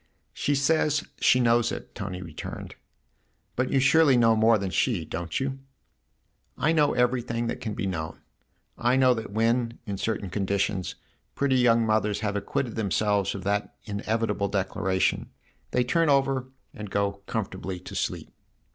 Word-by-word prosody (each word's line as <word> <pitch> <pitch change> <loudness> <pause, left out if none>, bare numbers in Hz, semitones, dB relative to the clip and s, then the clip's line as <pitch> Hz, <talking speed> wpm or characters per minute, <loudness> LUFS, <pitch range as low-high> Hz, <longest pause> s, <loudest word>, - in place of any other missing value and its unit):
" - - -46
She 145 - +2
says 150 +1 +2 0.2
she 125 - +4
knows 120 -1 +3
it," - - -7
Tony 95 -4 -5
returned. 80 -3 -7 0.4
" - - -44
But 130 +1 0
you 135 - +2
surely 140 0 +5
know 115 -1 +5
more 110 +1 +5
than 95 -2 -3
she, 95 -6 +1
don't 85 +1 -3
you? 135 0 -3 0.3
" - - -47
" - - -45
I 155 - +2
know 150 -3 +3
everything 120 -1 0
that 115 - -3
can 110 -3 -4
be 110 - -3
known. 80 -5 -4 0.6
I 120 +2 +3
know 130 -1 +5
that 110 -2 -5
when, 115 +3 +1
in 100 -2 -4
certain 100 -4 -2
conditions, 95 -1 -1 0.4
pretty 135 -2 +2
young 115 -2 +4
mothers 110 -1 +1
have 105 -1 -1
acquitted 110 +4 -2
themselves 105 -2 +1
of 95 - -6
that 100 +1 -1
inevi 110 +2 -1
table 100 -1 -1
declaration, 95 -1 0 0.4
they 125 - +2
turn 165 +5 +2
over 135 -2 +2 0.3
and 105 -1 -7
go 100 0 -1
comfortably 95 -4 -4
to - - -10
sleep." - - -3
110 Hz, 170 wpm, -26 LUFS, 100-125 Hz, 0.6 s, surely